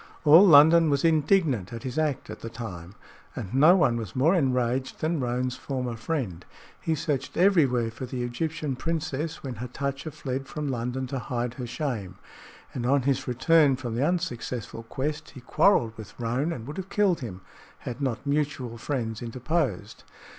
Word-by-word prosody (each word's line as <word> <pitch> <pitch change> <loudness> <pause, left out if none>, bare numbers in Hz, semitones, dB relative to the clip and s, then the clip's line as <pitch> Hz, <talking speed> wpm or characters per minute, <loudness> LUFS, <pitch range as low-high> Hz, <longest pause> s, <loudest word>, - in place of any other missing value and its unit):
All 160 +5 +9
London 160 +1 +7
was 140 +2 +1
indignant 155 - +2
at 115 -1 -7
his 130 +3 -3
act 145 -8 -1
at 110 - -8
the 115 - -6
time, 100 -6 -8 0.4
and 95 - -6
no 155 +7 +7
one 125 -10 +3
was 110 -5 -6
more 145 +7 +4
enraged 130 -5 0
than 160 0 0
Roane's 125 0 -1
former 125 -4 -3
friend. 110 - -3 0.4
He 160 - 0
searched 145 -4 -3
everywhere 140 - +3
for 125 +3 -7
the 125 0 -4
Egyptian 150 +3 -3
princess 155 +1 -3
when 130 -5 -5
Hatatcha 140 +5 -4
fled 135 -2 -5
from 150 +1 -4
London 125 +1 -2
to 130 +1 -4
hide 120 0 -3
her 125 -2 -6
shame, 115 - -4 0.6
and 125 - -4
on 140 0 +3
his 135 -1 0
return 140 +3 +4
from 125 -3 -5
the 120 +4 0
unsuccessful 125 - -2
quest, 150 +6 -4
he 130 - -9
quarreled 130 - +3
with 110 0 -11
Roane 125 +7 -1
and 120 -8 -6
would 145 +3 -7
have 190 0 -5
killed 200 -5 +2
him 95 -7 -7 0.4
had 125 +2 -6
not 130 -1 -2
mutual 140 -5 -2
friends 115 -4 -3
interposed. 125 -1 -2
130 Hz, 170 wpm, -26 LUFS, 120-155 Hz, 0.6 s, All